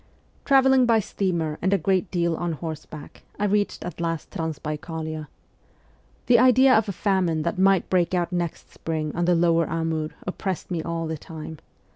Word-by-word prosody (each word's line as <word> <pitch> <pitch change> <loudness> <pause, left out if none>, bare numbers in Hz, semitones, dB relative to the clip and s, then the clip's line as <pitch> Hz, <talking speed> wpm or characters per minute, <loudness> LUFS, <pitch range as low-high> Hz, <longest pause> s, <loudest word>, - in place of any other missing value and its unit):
Travelling 265 -2 +5
by 230 -1 +5
steamer 170 -7 -2
and 190 +3 +2
a - - +4
great 190 +2 0
deal 170 -2 0
on 170 0 -2
horseback 155 -1 -8 0.2
I 210 - 0
reached 205 0 0
at 175 - -6
last 165 -2 -3
Transbaikalia. 160 -2 -4 1.0
The 240 -1 +5
idea 255 +1 +6
of 220 -2 +3
a - - 0
famine 180 -5 0
that 170 +2 -2
might 195 -1 +4
break 180 -1 +1
out 175 0 0
next 175 -2 -4
spring 155 -2 -3
on 175 +1 0
the 175 0 +3
lower 165 -1 +2
Amur 160 -1 -1 0.2
oppressed 185 0 -4
me 170 -2 -1
all 165 0 -3
the 160 -1 -4
time. 160 -1 -9
170 Hz, 170 wpm, -24 LUFS, 160-195 Hz, 1.0 s, idea